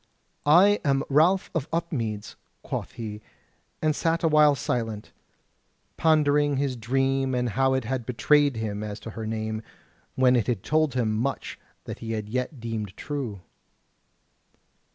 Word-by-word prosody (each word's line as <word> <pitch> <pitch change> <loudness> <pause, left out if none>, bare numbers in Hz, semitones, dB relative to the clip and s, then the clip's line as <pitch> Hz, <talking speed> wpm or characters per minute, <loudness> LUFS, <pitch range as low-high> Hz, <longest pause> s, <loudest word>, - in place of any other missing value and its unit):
"I 190 +7 +6
am 135 -2 +2
Ralph 165 +7 +3
of 160 -2 -2
Upmeads," 120 -11 -3 0.3
quoth - - -4
he; 110 -3 -6 0.6
and 155 -1 +2
sat 165 +2 0
a - - +4
while 150 -2 +5
silent, 115 -4 -3 0.8
pondering 145 -3 +3
his 135 -2 0
dream 135 +2 0
and 125 -1 0
how 135 +4 +2
it 130 - 0
had 120 0 -3
betrayed 145 +2 +3
him 105 -2 -3
as 105 0 -5
to 115 - -7
her 110 0 -6
name, 110 0 -3 0.5
when 130 -1 +4
it 120 - +1
had 115 -7 -1
told 155 -3 +1
him 115 -4 +1
much 125 +5 -3 0.2
that - - -7
he 115 0 -4
yet 125 +6 -4
deemed 110 -4 -5
true. 130 -10 -4
130 Hz, 145 wpm, -26 LUFS, 110-145 Hz, 0.8 s, I